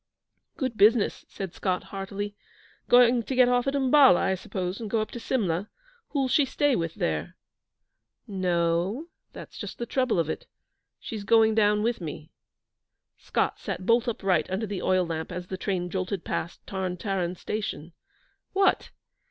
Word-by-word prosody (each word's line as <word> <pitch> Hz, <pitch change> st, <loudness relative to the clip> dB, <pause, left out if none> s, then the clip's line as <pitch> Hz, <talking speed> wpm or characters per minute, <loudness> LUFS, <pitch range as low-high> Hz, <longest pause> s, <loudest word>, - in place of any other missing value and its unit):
'Good 255 Hz, -5 st, -2 dB
business,' 215 Hz, +2 st, +4 dB
said 190 Hz, -3 st, -6 dB
Scott, 185 Hz, -2 st, -1 dB
heartily. 200 Hz, +1 st, -5 dB, 0.5 s
'Going 245 Hz, 0 st, +6 dB
to 260 Hz, +4 st, -4 dB
get 250 Hz, -1 st, +6 dB
off 245 Hz, +1 st, +2 dB
at 275 Hz, -, +1 dB
Umballa, 270 Hz, -5 st, +6 dB
I 190 Hz, -, +1 dB
suppose, 185 Hz, +1 st, -4 dB
and 220 Hz, -, -4 dB
go 225 Hz, -, +1 dB
up 215 Hz, -, -3 dB
to 240 Hz, -, -6 dB
Simla. 200 Hz, -6 st, -1 dB, 0.4 s
Who'll 275 Hz, -3 st, 0 dB
she 270 Hz, +3 st, +4 dB
stay 280 Hz, 0 st, +1 dB
with 165 Hz, -3 st, -2 dB
there?' 80 Hz, 0 st, -2 dB, 0.9 s
'No 180 Hz, -4 st, 0 dB
o; 175 Hz, -, 0 dB, 0.3 s
that's -, -, -10 dB
just -, -, -6 dB
the 235 Hz, -, -3 dB
trouble 255 Hz, -3 st, 0 dB
of 165 Hz, -3 st, +1 dB
it. -, -, -5 dB, 0.5 s
She's 215 Hz, -3 st, -6 dB
going 220 Hz, +1 st, +5 dB
down 210 Hz, -1 st, +3 dB
with 230 Hz, -3 st, 0 dB
me.' 155 Hz, -1 st, -7 dB, 0.9 s
Scott -, -, -1 dB
sat 185 Hz, -, -5 dB
bolt 235 Hz, +3 st, +3 dB
upright 195 Hz, -8 st, +1 dB
under 190 Hz, +4 st, -1 dB
the 200 Hz, -3 st, -4 dB
oil 185 Hz, -1 st, +2 dB
lamp 160 Hz, -1 st, -4 dB
as 180 Hz, 0 st, -5 dB
the 190 Hz, -, -5 dB
train 185 Hz, -2 st, -2 dB
jolted 185 Hz, 0 st, -3 dB
past 170 Hz, -, -4 dB
Tarn 185 Hz, -2 st, -3 dB
Taran 185 Hz, -2 st, -2 dB
station. 190 Hz, -7 st, -4 dB, 0.6 s
'What! 390 Hz, -1 st, +2 dB
200 Hz, 165 wpm, -27 LUFS, 180-235 Hz, 0.9 s, Going